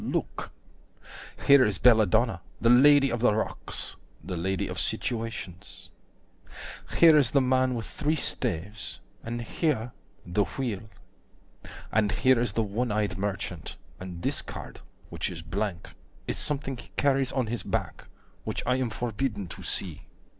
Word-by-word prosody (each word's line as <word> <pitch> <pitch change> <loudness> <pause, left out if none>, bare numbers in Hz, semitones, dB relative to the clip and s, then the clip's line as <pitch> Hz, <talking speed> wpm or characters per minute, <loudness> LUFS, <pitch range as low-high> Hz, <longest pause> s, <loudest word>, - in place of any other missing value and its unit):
Look!) - - -3 0.9
Here 140 -2 +8
is 105 -3 +1
Belladonna, 110 -4 +4 0.2
the 115 - +4
Lady 140 +2 +7
of 120 - -1
the 115 -3 +3
Rocks, 110 - -1 0.3
The 90 +3 -4
lady 95 +2 -1
of - - -4
situations. 95 - -4 1.0
50 - - -6
Here 165 -2 +8
is 135 -5 +3
the 140 - +4
man 130 -1 +2
with 115 - -3
three 150 +2 -1
staves, 100 - -3 0.2
and 120 +1 -4
here 125 -3 -1 0.3
the 100 +4 +1
Wheel, 115 -5 -3 1.0
And 105 -2 +2
here 130 -2 +4
is 120 - 0
the 115 - +1
one 110 +3 -1
eyed 105 -3 0
merchant, 95 -5 -3 0.2
and 90 -2 -7
this - - 0
card, - - -9 0.3
Which - - -3
is 85 -3 -7
blank, 95 0 -3 0.4
is - - -2
something 135 -3 -2
he - - -12
carries 135 -2 +2
on 130 -3 0
his 115 -1 -3
back, - - -3 0.4
Which - - -3
I 125 +1 +2
am 130 -2 0
forbidden 110 -1 -2
to - - -8
see. 85 -6 -2
115 Hz, 150 wpm, -28 LUFS, 100-130 Hz, 1.0 s, Here